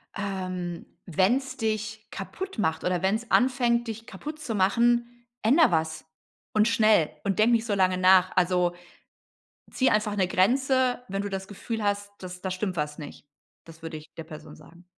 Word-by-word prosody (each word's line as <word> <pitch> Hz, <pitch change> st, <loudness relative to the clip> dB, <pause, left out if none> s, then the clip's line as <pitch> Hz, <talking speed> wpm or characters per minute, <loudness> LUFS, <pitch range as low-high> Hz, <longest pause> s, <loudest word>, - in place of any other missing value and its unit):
Ähm, 185 Hz, -4 st, -4 dB, 0.2 s
wenn's 245 Hz, -, +1 dB
dich 220 Hz, -1 st, -3 dB
kaputtmacht 220 Hz, -, -3 dB
oder 180 Hz, 0 st, 0 dB
wenn's 215 Hz, +5 st, 0 dB
anfängt, 245 Hz, -2 st, +2 dB
dich 225 Hz, 0 st, -6 dB
kaputtzumachen, 240 Hz, -1 st, 0 dB, 0.2 s
änder 280 Hz, -, +5 dB
was 160 Hz, -1 st, -1 dB, 0.5 s
und 215 Hz, +1 st, +4 dB
schnell 215 Hz, -8 st, +4 dB
und 195 Hz, -1 st, -1 dB
denk 225 Hz, +3 st, +5 dB
nicht 230 Hz, -1 st, +2 dB
so 210 Hz, -, -1 dB
lange 185 Hz, -1 st, +2 dB
nach. 185 Hz, 0 st, +5 dB
Also, 180 Hz, -1 st, +2 dB, 1.0 s
zieh 260 Hz, -, +2 dB
einfach 210 Hz, -1 st, +1 dB
'ne 185 Hz, -3 st, +1 dB
Grenze, 255 Hz, +6 st, +2 dB
wenn 195 Hz, +1 st, -2 dB
du 205 Hz, -, -3 dB
das 195 Hz, -1 st, -5 dB
Gefühl 220 Hz, +2 st, -5 dB
hast, 205 Hz, 0 st, -1 dB
dass 180 Hz, 0 st, -8 dB
da 190 Hz, -, -3 dB
stimmt 185 Hz, 0 st, -3 dB
was 150 Hz, 0 st, -3 dB
nicht. 145 Hz, -1 st, -10 dB, 0.4 s
Das 165 Hz, -1 st, -15 dB
würde 160 Hz, -1 st, -6 dB
ich 155 Hz, -, -11 dB
der 165 Hz, -, -7 dB
Person 155 Hz, -1 st, -11 dB
sagen. 175 Hz, +1 st, -17 dB
205 Hz, 160 wpm, -26 LUFS, 180-235 Hz, 1.0 s, änder